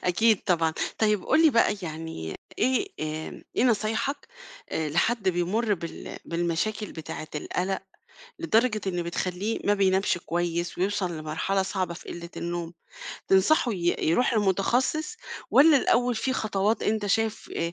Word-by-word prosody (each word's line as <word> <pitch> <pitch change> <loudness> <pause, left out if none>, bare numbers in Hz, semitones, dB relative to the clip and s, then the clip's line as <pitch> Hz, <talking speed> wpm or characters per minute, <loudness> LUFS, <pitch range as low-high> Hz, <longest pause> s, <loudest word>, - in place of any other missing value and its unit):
أكيد 210 +4 +3
طبعًا. 165 -3 +2 0.3
طيب 210 -3 +2
قُل 315 - +4
لي 320 - +7
بقى 230 -4 +3
يعني 160 - -5 0.2
إيه 260 +10 +2
آآ 155 0 -5
إيه - - +3
نصايحك، 225 +4 0 0.4
آآ، 160 -1 -1
لحد 205 +7 +1
بيمُر 200 +5 +1
بال 170 -2 -7
بالمشاكل 175 +5 -2
بتاعة 155 -1 -7
القلق 185 +5 -2 0.6
لدرجة 235 -8 +2
إن 175 -2 -1
بتخلّيه 185 +5 -2
ما 205 - +3
بينامش 190 -2 +2
كويس 170 0 -2
ويوصل 190 -1 0
لمرحلة 160 +5 -1
صعبة 185 -2 -2
في - - -12
قلِّة 170 0 -7
النوم؟ 170 0 -4 0.6
تنصحه 225 +6 +4
ي 175 -2 0
يروح 235 +7 +3
لمُتخصّص 235 - +1 0.3
والّا 300 +1 +7
الأول 245 -1 +2
فيه 260 +4 -1
خطوات 215 -2 0
أنت 215 -1 0
شايف 225 +2 0
آآ 170 0 -1
195 Hz, 140 wpm, -26 LUFS, 170-225 Hz, 0.6 s, لي